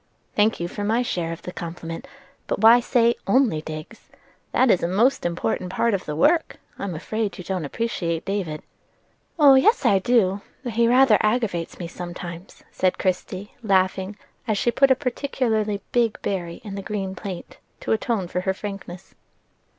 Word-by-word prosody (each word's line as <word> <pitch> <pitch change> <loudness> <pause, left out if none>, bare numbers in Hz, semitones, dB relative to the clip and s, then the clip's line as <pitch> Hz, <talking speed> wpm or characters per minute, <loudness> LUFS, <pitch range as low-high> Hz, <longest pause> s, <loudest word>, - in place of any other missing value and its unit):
"Thank 215 +2 +3
you 170 - -2
for 205 - -5
my 225 +4 +1
share 170 -8 -2
of 165 - -7
the 180 - -6
compliment; 170 +6 -7 0.4
but - - -1
why 230 +2 +8
say 235 -1 +3
'only 220 - +3
digs'? 155 +7 -9 0.4
That 255 -3 +4
is 180 - +3
a 170 - 0
most 210 +3 +2
important 175 +1 -2
part 235 +3 +1
of 195 - -2
the 150 - -4
work: 320 - +2 0.2
I'm 195 -4 -3
afraid 215 +6 -3
you 180 - -7
don't 180 -3 -3
appreciate 170 -2 -2
David." 190 -6 -3 0.7
"Oh, 290 -4 +8
yes, 280 - +4
I 200 -5 +5
do; 200 -3 +2 0.2
but 240 -3 -4
he 230 +1 +3
rather 250 -2 +5
aggravates 215 -7 0
me 175 - -5
sometimes," 175 +1 -8
said 185 -1 +1
Christie, 185 +1 -2
laughing, 190 -1 +1 0.3
as 215 -2 +1
she 240 - +2
put 275 +3 +4
a 260 - +6
particularly 235 -6 -1
big 235 -3 +1
berry 175 -4 -3
in 205 -3 -7
the 195 - -4
green 195 -1 -3
plate 190 -3 -8 0.2
to - - -3
atone 220 -4 0
for 180 +1 -2
her 190 +1 -1
frankness. 195 -3 -8
200 Hz, 175 wpm, -23 LUFS, 180-235 Hz, 0.7 s, why